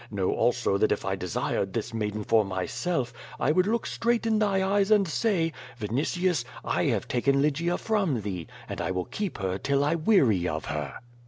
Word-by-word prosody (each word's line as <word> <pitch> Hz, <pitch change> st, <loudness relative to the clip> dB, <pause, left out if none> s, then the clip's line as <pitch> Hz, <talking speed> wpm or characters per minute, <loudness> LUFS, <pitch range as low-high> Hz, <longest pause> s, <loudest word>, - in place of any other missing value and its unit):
Know 100 Hz, -3 st, 0 dB
also 120 Hz, -4 st, +1 dB
that 110 Hz, -, +3 dB
if -, -, -1 dB
I 95 Hz, 0 st, 0 dB
desired 95 Hz, +1 st, -2 dB
this 115 Hz, -1 st, -3 dB
maiden 105 Hz, -1 st, -2 dB
for 110 Hz, +1 st, +4 dB
myself, 120 Hz, -, -2 dB, 0.3 s
I 150 Hz, -, +2 dB
would 185 Hz, +4 st, +3 dB
look 230 Hz, +2 st, 0 dB
straight 235 Hz, 0 st, 0 dB
in 220 Hz, -1 st, +2 dB
thy 195 Hz, -3 st, +2 dB
eyes 200 Hz, 0 st, +2 dB
and 210 Hz, -3 st, +4 dB
say: 165 Hz, -3 st, +1 dB, 0.3 s
*Vinitius, 145 Hz, -, 0 dB, 0.2 s
I -, -, +1 dB
have -, -, 0 dB
taken 140 Hz, +3 st, +2 dB
Lygia 155 Hz, +5 st, +1 dB
from 195 Hz, -, 0 dB
thee, 95 Hz, -5 st, -4 dB, 0.2 s
and -, -, -4 dB
I 85 Hz, -, -1 dB
will 90 Hz, -1 st, -1 dB
keep 205 Hz, -4 st, -4 dB
her 95 Hz, 0 st, -2 dB
till 140 Hz, 0 st, +1 dB
I 150 Hz, +3 st, +2 dB
weary 140 Hz, -, +3 dB
of 80 Hz, -2 st, -3 dB
her.' 75 Hz, -3 st, -4 dB
135 Hz, 190 wpm, -27 LUFS, -, 0.3 s, for